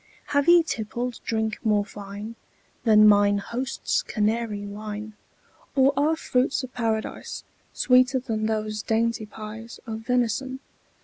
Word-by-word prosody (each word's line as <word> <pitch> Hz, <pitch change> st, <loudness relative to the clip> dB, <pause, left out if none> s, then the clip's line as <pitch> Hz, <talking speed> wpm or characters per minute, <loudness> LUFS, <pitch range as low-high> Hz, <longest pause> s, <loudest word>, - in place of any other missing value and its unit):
Have 285 Hz, +1 st, +2 dB
ye 345 Hz, -1 st, +8 dB
tippled 240 Hz, -2 st, -3 dB
drink 220 Hz, -1 st, -2 dB
more 210 Hz, -2 st, +2 dB
fine 205 Hz, +2 st, -8 dB, 0.5 s
Than 215 Hz, -1 st, +7 dB
mine 205 Hz, -1 st, +5 dB
host's 245 Hz, +6 st, -2 dB
Canary 215 Hz, -1 st, -1 dB
wine? 210 Hz, +1 st, -6 dB, 0.6 s
Or 270 Hz, 0 st, +5 dB
are 300 Hz, +4 st, +2 dB
fruits 260 Hz, -3 st, 0 dB
of 255 Hz, -, -8 dB
Paradise 225 Hz, -2 st, -3 dB, 0.3 s
Sweeter 255 Hz, 0 st, +4 dB
than 225 Hz, -4 st, -2 dB
those 215 Hz, -1 st, -2 dB
dainty 225 Hz, 0 st, 0 dB
pies 220 Hz, +2 st, -9 dB
Of 220 Hz, -2 st, -5 dB
venison? 250 Hz, +2 st, -1 dB
225 Hz, 125 wpm, -25 LUFS, 215-250 Hz, 0.6 s, ye